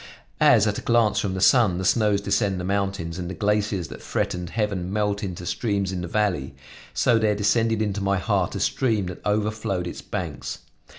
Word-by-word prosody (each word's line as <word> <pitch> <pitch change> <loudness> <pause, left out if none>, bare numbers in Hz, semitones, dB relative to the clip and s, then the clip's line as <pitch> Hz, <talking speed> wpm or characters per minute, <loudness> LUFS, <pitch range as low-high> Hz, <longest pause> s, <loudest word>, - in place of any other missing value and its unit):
As - - +6
at - - 0
a - - -8
glance 115 -2 +2
from 95 -2 -2
the - - -2
sun 105 -3 +5
the 95 - -3
snows 105 -1 +3
descend 100 -2 0
the - - -4
mountains 95 -3 -2
and 90 -1 -4
the 95 - -5
glaciers 100 -3 0
that - - -9
threatened 90 -1 -2
heaven 100 -4 -2
melt 105 -1 0
into 90 -2 -5
streams 100 -1 -1
in 90 -2 -3
the 85 - -4
valley, 90 -9 -1 0.4
so 120 -2 +3
there 105 -1 +2
descended 110 +2 +2
into 105 -1 -2
my 100 0 +1
heart 90 - 0
a - - -2
stream 110 -7 +1
that 90 -1 -7
overflowed 105 -3 -1
its 85 - -6
banks. - - -5
100 Hz, 195 wpm, -24 LUFS, 90-105 Hz, 0.4 s, As